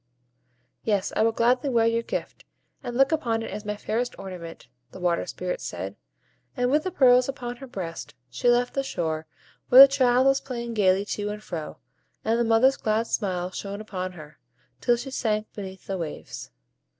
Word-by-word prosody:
"Yes, 205 -3 0
I - - +2
will 225 +1 +4
gladly 250 +4 +2
wear 230 -3 +3
your 230 0 +2
gift, - - -5 0.4
and 240 0 -5
look 270 +3 +4
upon 235 -8 0
it - - -6
as 210 +2 -6
my 210 0 -2
fairest 240 +4 -2
ornament," 180 -7 -8 0.2
the 185 - -11
Water 175 -1 0
Spirit - - -4
said; - - -5 0.6
and 245 0 +1
with 300 +3 +2
the - - 0
pearls 255 -5 +5
upon 245 -3 -5
her 270 - -10
breast, 175 -8 -6
she 125 - 0
left 245 +1 +2
the 275 - 0
shore, 160 -11 -3 0.4
where 255 +2 +11
the 275 - +12
child 260 -2 +3
was 270 0 +4
playing 235 -3 -5
gayly 195 -2 +3
to 205 0 -3
and 210 +1 -6
fro, 160 -6 -6 0.5
and 225 +1 +2
the - - +3
mother's 230 +4 +4
glad 220 +1 0
smile 185 -5 -2
shone 200 +2 -5
upon 185 -4 -5
her, 155 -3 -13 0.4
till 240 -1 +2
she 260 +3 -6
sank 215 -4 0
beneath 190 -2 -8
the 195 -1 -3
waves. 160 -3 -6
225 Hz, 185 wpm, -26 LUFS, 190-250 Hz, 0.6 s, the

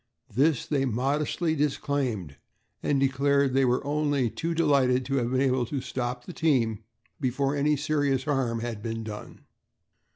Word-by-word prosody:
This 140 +3 +2
they 140 -3 0
modestly 145 +7 0
disclaimed 135 - -1 0.4
and 140 - +1
declared 140 0 +2
they 135 0 +4
were 125 +2 +1
only 145 -4 +1
too 165 +1 -3
delighted 135 -6 +3
to 135 0 -1
have 120 -2 0
been 130 +1 +1
able 130 -3 +1
to 140 +3 -2
stop 125 -1 -4
the 180 - -8
team 125 -11 +1 0.4
before 135 +1 0
any 150 +1 +2
serious 145 -2 0
harm 130 -6 0
had 115 -3 -4
been 115 0 -4
done. 105 -1 -8
135 Hz, 155 wpm, -27 LUFS, 125-145 Hz, 0.4 s, they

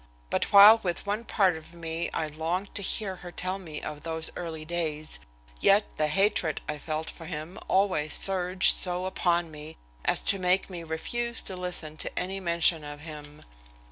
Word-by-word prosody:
But - - 0
while 205 +3 +10
with 175 -2 -2
one 210 +3 -2
part 190 -6 +3
of 160 +2 -11
me 165 0 -3
I 160 - -1
longed 160 +6 -3
to - - -2
hear 195 0 -1
her 175 0 -9
tell 185 +2 -3
me 160 -5 -7
of 150 -1 -6
those 160 0 -3
early 160 -3 -5
days, 155 -2 -2 0.4
yet 205 - +5
the 155 - +2
hatred 190 -2 +1
I 150 0 -3
felt 155 +1 -3
for 165 - -9
him 160 +1 -6
always 185 -6 +2
surged 185 -1 +4
so 180 0 -2
upon 175 -3 0
me 155 +1 -10 0.3
as - - +2
to 195 - +1
make 185 +1 +1
me 175 -2 -6
refuse 235 +9 -3
to 190 - -3
listen 180 -4 -4
to - - -5
any 190 +2 -2
mention 170 -3 +2
of 145 0 -8
him. 150 -1 -10
170 Hz, 180 wpm, -28 LUFS, 155-190 Hz, 0.4 s, while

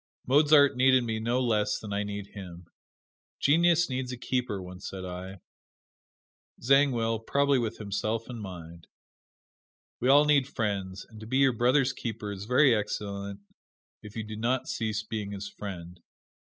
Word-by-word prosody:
Mozart 145 +1 +5
needed 130 0 +4
me 110 -2 -2
no 120 +3 0
less 105 -4 +1
than 105 -2 -7
I 100 - 0
need 100 -1 -5
him. 90 -3 -9 0.7
"Genius 170 +3 +4
needs 130 -1 -3
a 125 - -5
keeper," 125 -4 -2
once 90 +1 -8
said 95 -1 -7
I. 90 +1 -7 1.2
Zangwill, 120 -4 +3
probably 140 +4 +2
with 115 -3 -3
himself 110 +2 -3
in 120 -2 -7
mind. 85 -4 -9 1.1
We 125 - +1
all 145 +2 +7
need 145 -3 +3
friends 100 -6 -3
and 110 -2 -14
to 110 - -9
be 130 +3 0
your 135 -2 +4
brother's 125 +3 +2
keeper 110 -4 -5
is 100 0 -6
very 125 +3 +5
excellent 100 -2 -3 0.6
if 105 -1 -12
you 110 - -3
do 110 0 -7
not 120 +4 -1
cease 110 -4 -2
being 105 -2 -5
his 100 0 -6
friend. 90 -4 -8
110 Hz, 155 wpm, -28 LUFS, 100-130 Hz, 1.2 s, all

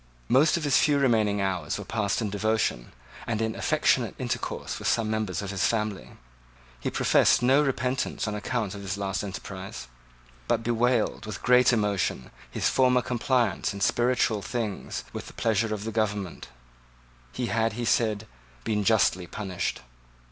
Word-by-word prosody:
Most 145 +7 +4
of 165 - -4
his 145 -3 +4
few 145 -2 +3
remaining 110 -7 +2
hours 95 -2 -1
were - - -7
passed 110 0 -1
in 105 - -2
devotion, 105 - 0 0.4
and 115 -2 -1
in 110 0 0
affectionate - - +1
intercourse - - -3
with - - -3
some 110 -2 +1
members 110 -3 -2
of 100 - -4
his 100 - +1
family. 105 -4 -2 0.7
He - - -2
professed - - +3
no 135 +4 +5
repentance 130 -4 -1
on 105 - -2
account 105 -1 -2
of 100 - -7
his 100 0 -4
last 95 -1 -2
enterprise, 95 -4 -7 0.6
but 115 - +1
bewailed, 120 -1 +1
with 110 - -6
great 125 0 +5
emotion, 100 - 0 0.2
his - - -1
former 125 -1 +3
compliance 120 -5 0
in 100 - -7
spiritual 120 -1 +2
things 110 -1 -4
with - - -6
the - - -11
pleasure 110 0 0
of 105 -1 -3
the 115 - -4
government 105 -4 -2 0.8
He 125 - -3
had, 115 -1 +1
he 120 +2 -3
said, 110 -2 +1 0.4
been 105 -2 0
justly 95 -4 +2
punished. 95 -1 -3
110 Hz, 160 wpm, -27 LUFS, 100-120 Hz, 0.8 s, no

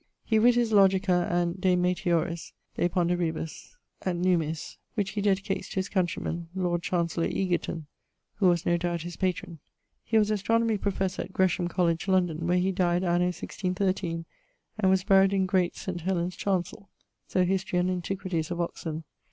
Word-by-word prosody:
He 220 -1 +2
writ 240 +2 +5
his 240 -2 +2
Logica, 190 -3 +4
and..., 175 +1 0
de 185 -1 +4
meteoris, 175 -2 0 0.2
de 175 - +1
ponderibus 170 - -2 0.3
et 185 -2 0
nummis 170 -3 0 0.2
(which 200 -3 -1
he 205 0 -2
dedicates 195 -1 0
to - - -8
his 190 0 -1
countryman, 175 -2 -2
Lord 175 -2 0
Chancellor 170 -1 0
Egerton, 175 -3 -1 0.5
who 195 - +3
was 175 -2 +2
no 175 - +3
doubt 170 -1 -2
his 175 0 -6
patron). 180 -3 -2 0.4
He 225 - +1
was 215 -1 +3
astronomie 225 +1 +1
professor 190 -2 -1
at 185 - -8
Gresham 180 -1 +2
College, 170 0 0
London, 175 -4 +1
where 180 +1 +3
he 185 +2 +2
died 180 -1 +1
anno 175 0 +2
1613, 180 -1 -2 0.5
and 190 -3 +3
was 190 -1 +3
buried 195 -1 +5
in 190 -1 +2
Great 185 -1 +1
Saint 180 -2 -5
Helen's 180 0 -1
chancell: 190 0 -2 0.4
so 185 -1 +2
_Hist. 185 -1 0
and 180 0 0
Antiq. 180 -3 -3
of 175 0 -3
Oxon. 165 -2 -3
180 Hz, 165 wpm, -28 LUFS, 175-190 Hz, 0.5 s, writ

